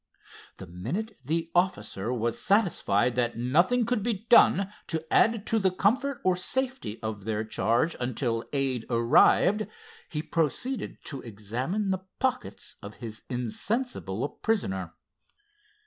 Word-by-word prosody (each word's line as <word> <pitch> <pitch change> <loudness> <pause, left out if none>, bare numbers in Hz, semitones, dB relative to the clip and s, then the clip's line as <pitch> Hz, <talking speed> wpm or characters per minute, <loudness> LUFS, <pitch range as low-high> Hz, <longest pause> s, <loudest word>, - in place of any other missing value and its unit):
The 95 - -8
minute 120 - -5
the 165 +4 -1
officer 175 - 0
was 120 -2 -1
satisfied 160 - +2
that 120 -2 0
nothing 175 - +3
could 240 -2 0
be 220 -1 -2
done 200 -4 +6
to 160 -1 -3
add 225 -2 +4
to 225 - +2
the 190 -2 +3
comfort 255 +9 +1
or 185 -1 +3
safety 245 - -2
of 110 -2 -4
their 110 -1 -1
charge 115 +7 +1
until 120 -2 -1
aid 135 -4 0
arrived, 140 - +4 0.4
he 150 -1 -3
proceeded 170 - -1
to 140 -3 -4
examine 125 - -2
the 190 - 0 0.2
pockets 255 -1 -2
of 105 -1 -9
his 110 -3 -7
insensible 125 - -2
prisoner. 95 - -2
150 Hz, 130 wpm, -28 LUFS, -, 0.4 s, done